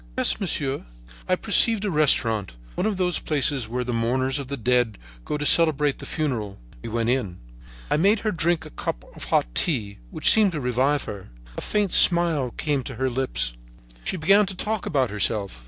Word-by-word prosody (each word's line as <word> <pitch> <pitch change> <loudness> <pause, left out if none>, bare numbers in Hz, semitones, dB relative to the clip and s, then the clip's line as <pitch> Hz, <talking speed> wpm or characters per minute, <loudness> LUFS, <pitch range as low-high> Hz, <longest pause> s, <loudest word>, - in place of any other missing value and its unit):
"'Yes, - - +2
monsieur.' 145 -8 -2 0.5
"I - - +4
perceived 225 -3 +3
a 200 - -1
restaurant, 115 - +2 0.2
one 200 - -1
of 210 -3 -2
those 180 -2 +1
places 140 -5 -1
where 125 +2 -2
the 125 0 -3
mourners 130 +4 0
of 140 - -6
the 140 +1 -4
dead 120 -2 +1 0.3
go 150 - -2
to 145 - -4
celebrate 150 -3 +3
the - - -8
funeral. 115 -10 -3 0.2
We - - -7
went 115 +1 0
in. 105 -9 -2 0.5
I - - +3
made 200 +6 +3
her 215 - 0
drink 170 -1 0
a - - -11
cup - - -5
of - - -8
hot - - +2
tea, 110 - -1
which - - +2
seemed 210 -4 +4
to 155 - -3
revive 130 +3 +1
her. 100 -3 -8 0.3
A - - -5
faint 205 -3 -1
smile 170 -7 +4
came 145 +2 -2
to 130 - -7
her 130 +2 -1
lips. 125 - -2 0.5
She 185 - -3
began 195 +6 +4
to 190 - -5
talk 210 +2 -3
about 130 -6 0
herself. 100 - -1
140 Hz, 195 wpm, -24 LUFS, 120-170 Hz, 0.5 s, I